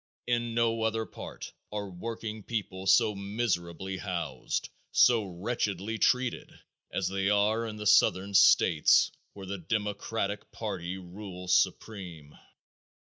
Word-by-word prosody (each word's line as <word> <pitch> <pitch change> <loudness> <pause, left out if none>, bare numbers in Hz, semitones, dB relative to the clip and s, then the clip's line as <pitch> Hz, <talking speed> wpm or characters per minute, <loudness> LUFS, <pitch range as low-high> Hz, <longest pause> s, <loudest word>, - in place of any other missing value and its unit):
In 120 -1 -1
no 115 -1 +2
other 110 0 0
part - - -9 0.2
are 105 -1 -3
working 110 +3 -6
people 95 -4 -4
so 110 +2 +5
miserably 95 -3 -2
housed, 85 -9 -3 0.2
so 120 -3 +5
wretchedly 100 +2 -3
treated 125 -1 +1 0.4
as 95 - -1
they 95 0 0
are 105 +3 +2
in 110 - -6
the 105 0 -7
southern 100 -2 +4
states 80 -4 +5 0.2
where 100 -1 -9
the 100 +1 -5
democratic 105 +2 -2
party 95 -4 -4
rules 90 0 -5
supreme. 90 -6 -2
100 Hz, 120 wpm, -29 LUFS, 95-110 Hz, 0.4 s, so